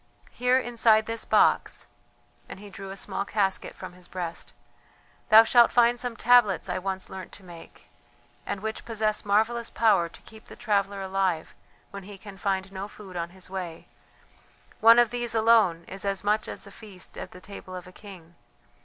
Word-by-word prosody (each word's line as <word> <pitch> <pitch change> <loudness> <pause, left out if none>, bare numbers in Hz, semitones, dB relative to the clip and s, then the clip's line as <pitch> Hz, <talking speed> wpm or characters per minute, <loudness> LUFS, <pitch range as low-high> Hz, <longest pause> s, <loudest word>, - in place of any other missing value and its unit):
Here 250 +1 +2
inside 230 -3 +3
this 230 0 -4
box" - - +2 0.6
and - - -9
he 205 0 -12
drew 195 0 -9
a 195 - -7
small - - -3
casket 200 -2 -1
from 185 -2 -9
his 180 0 -14
breast 175 -2 -6 0.8
"thou 220 +1 +9
shalt 235 +1 +5
find 240 0 +4
some 245 -2 -4
tablets 240 -4 +4
I - - -2
once 190 0 -4
learnt 190 -1 -9
to 200 - -13
make, 170 -2 -14 0.6
and 195 - -5
which 220 +1 -4
possess 215 -2 -1
marvellous 220 +3 +1
power 200 -7 +2
to - - -16
keep 220 0 -15
the - - -11
traveller 200 -1 -1
alive 190 -4 -1 0.4
when 200 - -7
he 200 +1 -11
can 195 0 -12
find 195 -1 -2
no 195 +1 -6
food 200 -3 -13
on 170 -1 -3
his 185 +1 -9
way; 180 -3 -6 0.9
one 230 +1 +7
of 240 -2 +4
these 240 -1 -3
alone 220 -7 +4
is 195 - -8
as 195 -1 -1
much 210 +1 +1
as - - -6
a 200 - -12
feast 200 -4 -10
at - - -7
the 180 - -13
table 185 -1 -10
of 180 - -8
a 185 - -13
king. 185 -4 -13
200 Hz, 185 wpm, -26 LUFS, 190-220 Hz, 0.9 s, thou